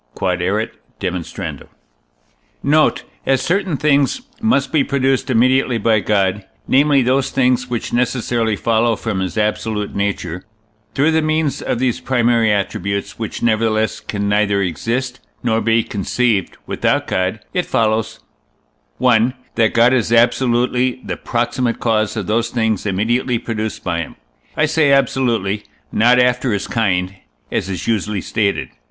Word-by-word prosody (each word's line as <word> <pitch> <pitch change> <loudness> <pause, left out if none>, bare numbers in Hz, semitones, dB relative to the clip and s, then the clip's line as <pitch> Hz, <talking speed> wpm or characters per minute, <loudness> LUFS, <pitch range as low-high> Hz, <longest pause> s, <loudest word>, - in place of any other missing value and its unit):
Q.E.D. 95 +4 -1 1.9
Note. 155 +2 +3 0.2
As 135 -1 +3
certain 185 -3 0
things 145 - +2 0.2
must 140 - +1
be 155 -3 +3
produced 135 -1 0
immediately 130 +1 +3
by 110 0 +2
God, 100 -1 0 0.2
namely 140 0 +4
those 130 +2 +1
things 125 -1 +1
which 120 -2 -3
necessarily 120 -2 0
follow 115 +2 +1
from 105 -3 -3
his 95 +3 -3
absolute 105 0 -1
nature, 100 -3 -3 0.5
through 145 +4 +3
the 160 0 +2
means 155 -1 0
of - - -1
these 125 -1 0
primary 120 -3 +2
attributes, 100 0 -2
which, 110 - -5
nevertheless, 110 -1 +1
can 100 -1 -3
neither 105 -1 +2
exist 115 +8 -2 0.2
nor 115 -2 +1
be 115 0 +2
conceived 105 -1 -1
without - - 0
God, 95 +4 -1
it 180 - -1
follows: 110 -1 0 0.8
1. 125 0 +3 0.2
That 110 -1 +1
God 120 +2 +5
is 115 -3 +1
absolutely 125 +1 +2
the - - -3
proximate 120 0 -1
cause 110 -1 0
of 105 - -2
those 115 +4 0
things 110 -4 -1
immediately 115 +5 0
produced 110 -1 -4
by 85 -2 -1
him. 85 - -6 0.4
I 155 - +4
say 155 -2 +2
absolutely, 115 -7 +1 0.3
not 120 +3 +4
after 125 -1 +2
his 100 - -2
kind, 95 -4 -1 0.3
as 95 - -2
is 95 - -4
usually 105 -3 -1
stated. 100 -2 -1
115 Hz, 135 wpm, -18 LUFS, 105-130 Hz, 1.9 s, God